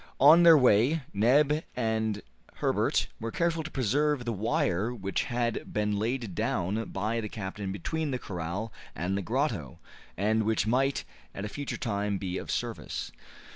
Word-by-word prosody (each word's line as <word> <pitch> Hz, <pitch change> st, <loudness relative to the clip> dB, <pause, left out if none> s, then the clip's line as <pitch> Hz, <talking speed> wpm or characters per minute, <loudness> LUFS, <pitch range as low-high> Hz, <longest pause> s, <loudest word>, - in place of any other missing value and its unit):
On 155 Hz, +6 st, +8 dB
their 165 Hz, -2 st, +9 dB
way 130 Hz, +4 st, +4 dB
Neb 140 Hz, +9 st, +3 dB
and 110 Hz, -3 st, -1 dB, 0.3 s
Herbert -, -, +1 dB
were 115 Hz, -, -3 dB
careful 165 Hz, +5 st, 0 dB
to 155 Hz, -, -6 dB
preserve 140 Hz, +1 st, +1 dB
the 120 Hz, -, -1 dB
wire 105 Hz, 0 st, 0 dB
which 100 Hz, -5 st, -2 dB
had 120 Hz, -1 st, -2 dB
been 105 Hz, -1 st, 0 dB
laid 115 Hz, -2 st, -2 dB
down 100 Hz, +6 st, -1 dB
by 110 Hz, +4 st, -2 dB
the 105 Hz, -, -5 dB
captain 100 Hz, -2 st, -5 dB
between 155 Hz, -, -2 dB
the 130 Hz, -, -1 dB
corral 95 Hz, +1 st, -5 dB, 0.2 s
and 90 Hz, +4 st, -1 dB
the 100 Hz, -, -1 dB
grotto, 110 Hz, -, -1 dB, 0.4 s
and 110 Hz, +4 st, +2 dB
which 110 Hz, -1 st, +1 dB
might 135 Hz, +5 st, +1 dB, 0.3 s
at 100 Hz, -, -4 dB
a -, -, -4 dB
future 145 Hz, +5 st, -4 dB
time 100 Hz, -3 st, -1 dB
be 95 Hz, -1 st, -3 dB
of -, -, -9 dB
service. -, -, -3 dB
110 Hz, 160 wpm, -29 LUFS, 100-135 Hz, 0.4 s, their